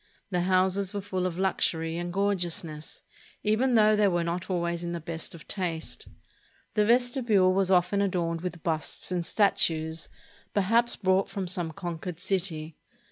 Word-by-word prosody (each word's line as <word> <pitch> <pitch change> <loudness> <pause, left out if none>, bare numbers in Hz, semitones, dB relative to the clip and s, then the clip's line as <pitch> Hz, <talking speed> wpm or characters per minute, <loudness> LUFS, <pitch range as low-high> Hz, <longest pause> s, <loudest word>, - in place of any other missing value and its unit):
The 180 -1 +1
houses 190 +2 +2
were 200 - -1
full 185 -2 -2
of 175 -1 -5
luxury 165 -3 0
and 175 +1 -3
gorgeousness, 175 -5 -1 0.4
even 240 +4 +2
though 215 -1 +6
they 210 -1 +4
were 175 -2 +1
not 170 +2 -3
always 170 -1 -1
in 170 0 -3
the 170 - -3
best 165 +1 -5
of 165 - -13
taste. 170 -4 -3 0.7
The 210 -1 +3
vestibule 235 -5 +3
was 190 -1 +2
often 190 +2 +3
adorned 170 -4 0
with 175 -2 -5
busts 160 +2 -2
and 180 -1 0
statues, 165 -5 +1 0.5
perhaps 230 +4 +3
brought 190 0 +2
from 195 -2 -4
some 175 -2 -2
conquered 175 -1 -6
city. 165 -6 -2
185 Hz, 155 wpm, -28 LUFS, 170-200 Hz, 0.7 s, though